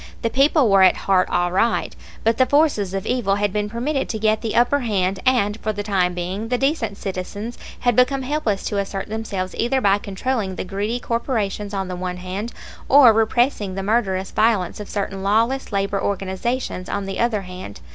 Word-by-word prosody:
The 230 - 0
people 275 +1 +4
were 195 -2 +5
at 185 -1 +6
heart 185 -2 +3
all 175 0 +1
right; 225 +6 +1 0.3
but 225 +2 +1
the 260 - +5
forces 260 - +2
of 195 - -3
evil 235 -6 +1
had 205 -1 0
been 210 0 -1
permitted 265 +6 -2
to 220 - -2
get 215 0 +1
the 225 - -3
upper 245 +4 +3
hand, 195 -6 0
and 225 -4 +2
for 215 - -1
the 205 0 -4
time 185 -4 +1
being 185 +5 -3
the 250 +1 0
decent 255 -7 -1
citizens 200 +5 -5 0.3
had 245 -2 +2
become 260 +2 +3
helpless 255 -8 -1
to 205 - -1
assert 195 0 -4
themselves 205 -4 -4
either 255 +3 +2
by 200 -4 +3
controlling 200 0 -2
the - - -4
greedy 205 +5 -2
corporations 220 -4 -2
on 195 -2 -2
the 180 - -4
one 180 0 -4
hand 190 +5 -5 0.4
or 260 -4 +8
repressing 220 -3 +1
the 195 - -3
murderous 195 -3 0
violence 215 -4 +1
of 210 - -7
certain 195 -1 -3
lawless 230 +7 +1
labor 200 0 0
organizations 195 +1 -2
on 200 -1 -2
the 195 0 -4
other 225 -4 +1
hand. 180 - -9
205 Hz, 195 wpm, -21 LUFS, 195-240 Hz, 0.4 s, or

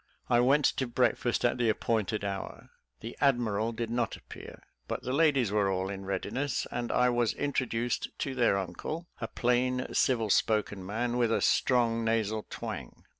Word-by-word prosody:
I 120 - +5
went 135 +4 +4
to 130 - +1
breakfast 120 0 +1
at 120 - +1
the 120 -2 +2
appointed 110 -1 0
hour. 100 -1 -5 0.3
The 115 - -7
admiral 115 -5 +2
did 115 0 -4
not 120 -2 -1
appear, - - -12 0.2
but - - -4
the 130 - -2
ladies 140 -7 +3
were 105 -2 +2
all 95 +1 -1
in 95 -1 -6
readiness, 105 +9 -2
and 120 -1 -3
I 125 0 +3
was 120 -2 +1
introduced 120 -4 -1
to 135 - -3
their 120 -6 +3
uncle 100 - -4
a 115 - -3
plain, 125 +2 +1
civil 115 -5 +2
spoken 105 -3 +1
man, 120 +5 -2
with 120 -2 +2
a - - +2
strong 115 -2 +2
nasal 110 -1 0
twang. - - -7
115 Hz, 170 wpm, -30 LUFS, 105-125 Hz, 0.3 s, I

